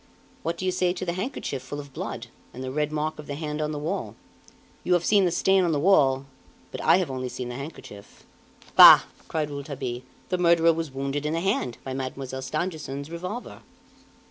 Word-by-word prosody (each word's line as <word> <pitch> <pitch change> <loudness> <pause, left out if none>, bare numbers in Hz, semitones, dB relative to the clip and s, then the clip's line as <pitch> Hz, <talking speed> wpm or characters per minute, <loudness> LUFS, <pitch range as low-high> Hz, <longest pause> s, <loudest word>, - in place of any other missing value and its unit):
What 165 +1 -2
do 185 - -4
you 185 - +2
say 180 -1 +1
to 185 - -5
the 170 - -1
handkerchief 185 - -4
full 145 +3 -7
of 140 -2 -10
blood, - - -5 0.3
and 130 - -6
the 130 - -4
red 150 +2 -1
mark 155 0 -2
of 150 - -9
the 145 - -4
hand 150 0 -4
on 150 0 -1
the 150 - -4
wall? 160 +7 -3 0.7
You 180 - +2
have 175 -1 +2
seen 205 -3 +4
the 175 - +1
stain 190 +2 +3
on 170 -2 +1
the 145 - +1
wall, 140 -6 +4 0.5
but - - -6
I - - +5
have 180 -7 -1
only 130 -1 -3
seen 125 0 -5
the 120 - -6
handkerchief." 140 -7 -10 0.5
"Bah!" - - +11 0.3
cried 150 -2 -2
Rouletabille, 135 -4 -5 0.3
"the 180 - 0
murderer 170 -1 +5
was 165 -1 -3
wounded 135 +2 -3
in 150 +1 -1
the 165 - 0
hand 170 - -1
by 135 - -5
Mademoiselle 130 0 -5
Stangerson's 145 0 -4
revolver!" 180 +8 -6
150 Hz, 205 wpm, -26 LUFS, 135-175 Hz, 0.7 s, Bah